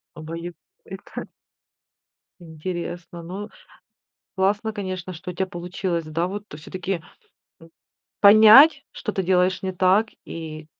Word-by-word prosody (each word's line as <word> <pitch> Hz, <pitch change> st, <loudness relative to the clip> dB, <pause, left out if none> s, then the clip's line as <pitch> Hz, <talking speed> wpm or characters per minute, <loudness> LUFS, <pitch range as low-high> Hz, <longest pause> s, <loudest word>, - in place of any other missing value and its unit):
Обоюд 165 Hz, +2 st, -7 dB, 0.3 s
эта. 190 Hz, +1 st, -9 dB, 1.1 s
Интересно, 175 Hz, +1 st, -6 dB
ну, 190 Hz, +5 st, -7 dB, 0.9 s
классно, 205 Hz, +3 st, +1 dB
конечно, 185 Hz, -3 st, -5 dB
что 180 Hz, +2 st, -7 dB
у -, -, -16 dB
тя 190 Hz, -, 0 dB
получилось, 175 Hz, -1 st, -4 dB
да, 165 Hz, +3 st, -2 dB
вот, 205 Hz, +2 st, -6 dB
всё-таки, 175 Hz, +3 st, -5 dB, 0.6 s
м, 165 Hz, -, -16 dB, 0.5 s
понять, 220 Hz, +9 st, +8 dB
что -, -, -4 dB
ты 190 Hz, -, -1 dB
делаешь 185 Hz, +1 st, +2 dB
не 190 Hz, -, -2 dB
так, 185 Hz, +4 st, +3 dB, 0.2 s
и 155 Hz, -1 st, -8 dB
185 Hz, 115 wpm, -23 LUFS, 170-195 Hz, 1.1 s, понять